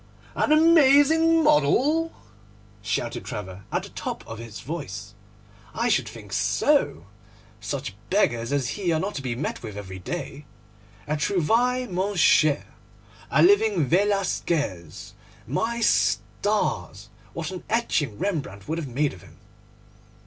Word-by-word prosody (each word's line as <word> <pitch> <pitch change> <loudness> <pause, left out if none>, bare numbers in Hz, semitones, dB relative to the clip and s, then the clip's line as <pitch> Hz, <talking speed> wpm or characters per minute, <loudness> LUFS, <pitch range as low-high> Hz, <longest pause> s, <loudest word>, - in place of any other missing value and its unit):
'An - - +1
amazing 320 +1 +5
model?' 295 - +3 0.7
shouted 100 - -3
Trevor 95 -1 -7
at - - -1
the - - -9
top - - -6
of 115 0 -7
his 115 -2 -8
voice; 105 - -6 0.6
'I - - 0
should - - +1
think - - -11
so! 80 +3 +1 0.5
Such 110 +2 -4 0.2
beggars 120 - +1
as 140 -4 0
he 190 -4 -1
are 160 - +1
not 200 +5 -3
to 140 - -4
be 125 -3 -3
met 150 +6 -4
with 105 -3 -8
every 95 -2 -7
day. 145 - -6 0.6
A 150 +1 -1
trouvaille, 230 - +1
mon 195 +2 -2
cher; 155 -4 +4 0.6
a - - +4
living 220 - +4
Velasquez! 170 - -1 0.3
My 230 - -2
stars! 100 - 0 0.2
what 165 +1 -4
an 185 - -7
etching 150 - 0
Rembrandt 140 - -3
would 160 +2 -2
have 155 - -5
made 140 +4 0
of 90 - -13
him! - - -17
155 Hz, 135 wpm, -25 LUFS, -, 0.7 s, amazing